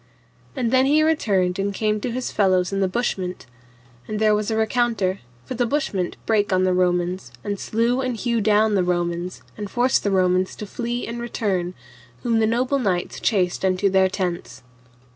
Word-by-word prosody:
And 245 -4 -1
then 260 0 +4
he 305 +2 +4
returned 195 - +1
and 200 +1 0
came 215 +1 -1
to 250 - -2
his 250 +1 -3
fellows 185 -2 +2
in 195 - 0
the 195 - +2
bushment. 185 -4 -2 0.6
And 215 - -3
there 215 -1 +4
was 210 +1 0
a 220 - 0
recounter, 220 -4 +1 0.3
for - - -5
the 245 -1 0
bushment 215 -10 -1
brake 210 -3 +1
on 185 0 +3
the 185 0 +2
Romans, 180 -4 0
and 205 -1 -3
slew 235 +4 0
and 255 -3 -2
hew 235 0 0
down 215 +1 +3
the 190 -3 +3
Romans, 175 0 -2
and 205 -1 -5
forced 245 +3 +2
the 205 - +1
Romans 185 -1 +2
to 210 - -6
flee 240 +3 -3
and 235 +1 -5
return, 195 -7 -2 0.5
whom 230 -2 +2
the 220 - +3
noble 255 +5 +1
knights 185 -7 -1
chased 185 -5 0
unto 190 +1 +2
their 190 0 +4
tents. 170 -10 -4
205 Hz, 185 wpm, -22 LUFS, 185-235 Hz, 0.6 s, then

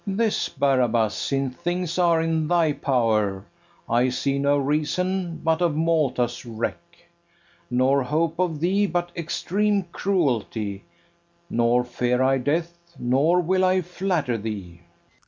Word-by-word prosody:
This, 215 +2 0
Barabas; 120 -6 +1
since 135 -2 -2
things 175 0 -2
are 170 -2 +3
in 160 -1 0
thy 165 -3 +2
power, 110 -8 0 0.4
I 120 +2 +2
see 140 +2 -1
no 140 +1 +2
reason 165 +5 -1
but 160 +1 +1
of 170 -4 +2
Malta's 150 -7 0
wreck, 115 -1 -4 0.9
Nor 130 +3 +2
hope 160 +5 -1
of 170 -5 0
thee 195 +4 +2
but 175 0 -2
extreme 200 +4 0
cruelty: 115 - -1 0.7
Nor 120 +1 +2
fear 125 0 -1
I 135 0 +3
death, 165 +6 -1 0.2
nor 140 +9 +2
will 185 +2 +1
I 185 0 +3
flatter 175 - -1
thee. 100 -6 -6
150 Hz, 125 wpm, -24 LUFS, 125-175 Hz, 0.9 s, are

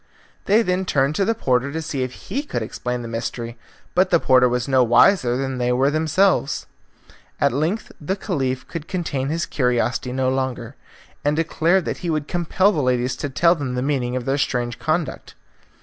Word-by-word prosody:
They 215 +4 +4
then 180 -1 0
turned 140 -4 +1
to 195 - +2
the 225 +3 +1
porter 130 - 0
to 160 - -3
see 150 -4 -3
if 130 0 -3 0.2
he 275 - -1
could 200 - -4
explain 125 +2 -4
the - - -6
mystery, 115 +1 -4 0.4
but 185 +1 +3
the 170 - +4
porter 130 -3 +4
was 125 +1 -1
no 130 -2 +4
wiser 120 - +4
than 135 -1 -3
they 125 0 +1
were 130 +3 +2
themselves. 160 +1 +1 0.7
At - - +3
length 160 - -1
the 170 +6 -1
Caliph 135 -11 -2
could 165 -3 -6
contain 145 -7 -2
his 165 +2 -1
curiosity 125 -1 0
no 130 0 0
longer, 130 -1 -3 0.5
and 145 +1 +1
declared 165 +2 +1
that - - -3
he 175 - -4
would 155 -2 -1
compel 175 +3 +2
the 155 - -1
ladies 125 -1 0
to 145 - -3
tell 170 +6 +4
them 140 -7 -4
the 125 - -1
meaning 130 -3 -1
of 125 -1 -3
their 135 +2 0
strange 120 -4 -1
conduct. 155 0 -2
135 Hz, 195 wpm, -22 LUFS, 125-165 Hz, 0.7 s, They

